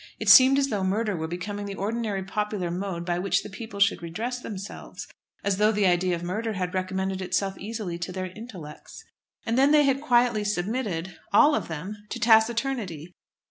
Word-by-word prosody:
It - - -1
seemed 265 +1 +9
as 275 0 +2
though 205 -5 -1
murder 205 +2 0
were 160 -1 -3
becoming 200 +4 -5
the 200 - -5
ordinary 210 -1 -2
popular 195 -2 -2
mode 180 -1 -4
by 175 0 -1
which 195 +2 +1
the 210 - -9
people 200 0 -8
should 200 -3 +3
redress 225 +9 -4
themselves, 200 -4 -8 0.4
as 200 -1 0
though 210 +1 +4
the 210 -2 +1
idea 180 0 +2
of 170 - -7
murder 215 +6 -2
had 180 -1 -3
recommended 190 0 -2
itself 195 +1 -1
easily 205 -5 -5
to 175 +1 -4
their 185 0 -4
intellects. 190 -10 -10 0.4
And 230 +2 +1
then 275 +1 +5
they 300 0 +5
had 275 -1 +1
quietly 240 -5 +3
submitted 200 -3 -2
all 300 0 +6
of - - -1
them 170 +6 -6
to - - -5
taciturnity. 220 - +2
200 Hz, 185 wpm, -26 LUFS, 185-225 Hz, 0.4 s, seemed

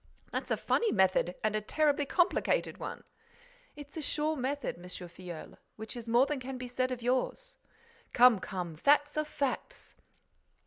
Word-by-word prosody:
"That's - - -3
a - - +1
funny 470 - +1
method 185 -2 +3
and 215 0 +1
a 215 - 0
terribly 290 +4 +1
complicated 365 - +1
one!" - - -6 0.7
"It's 290 -1 -11
a 320 - -3
sure 300 +1 0
method, 280 - -2
M. 175 - -13
Filleul, 175 -2 -9 0.2
which 220 +3 -7
is 235 -1 -7
more 240 +3 +5
than 295 -1 -2
can 260 +1 -6
be 250 0 -6
said 255 +1 0
of 245 -2 -4
yours." 260 - -1 0.5
"Come, 245 -4 +6
come! 180 -4 -5
Facts 290 - +3
are 305 - +1
facts." 295 - -4
255 Hz, 165 wpm, -31 LUFS, 215-295 Hz, 0.7 s, Come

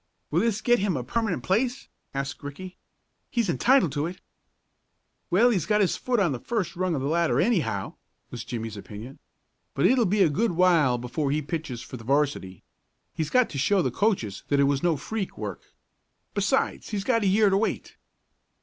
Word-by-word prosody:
"Will 160 - +2
this 215 0 0
get 240 -1 +3
him 190 -6 0
a 125 - -3
permanent 200 - -2
place?" 245 - 0 0.2
asked 135 0 -4
Ricky. 180 +6 -8 0.5
"He's 230 -7 0
entitled 250 - +3
to 145 +2 -1
it." 180 +2 -8 1.1
"Well, 235 +7 +4
he's 185 -8 0
got 210 -1 +3
his 195 -4 +2
foot 245 -2 -1
on 185 -6 +2
the 125 - -3
first 210 - -2
rung 180 -1 0
of 135 - -2
the - - 0
ladder 170 +2 +2
anyhow," 150 - 0 0.4
was 120 -2 -6
Jimmie's 115 -3 -5
opinion. 105 +6 -9 0.6
"But - - +2
it'll 245 -4 +4
be 200 +2 +3
a - - +5
good 200 +7 0
while 165 -8 +4
before 125 +4 -2
he 150 +2 0
pitches 150 -6 -4
for 130 - -8
the 115 - -11
'varsity. 135 - -1 0.5
He's 155 -2 -2
got 250 -2 +4
to 140 - -4
show 190 +6 +3
the 130 - 0
coaches 125 - 0
that 140 - +2
it - - +5
was 140 -1 +1
no 170 -3 +2
freak 200 +7 -4
work. - - -7 0.6
Besides - - 0
he's 205 -3 -2
got 230 0 +2
a 200 - +1
year 200 +1 +4
to 195 - +3
wait." 220 - -2
170 Hz, 195 wpm, -26 LUFS, 135-210 Hz, 1.1 s, a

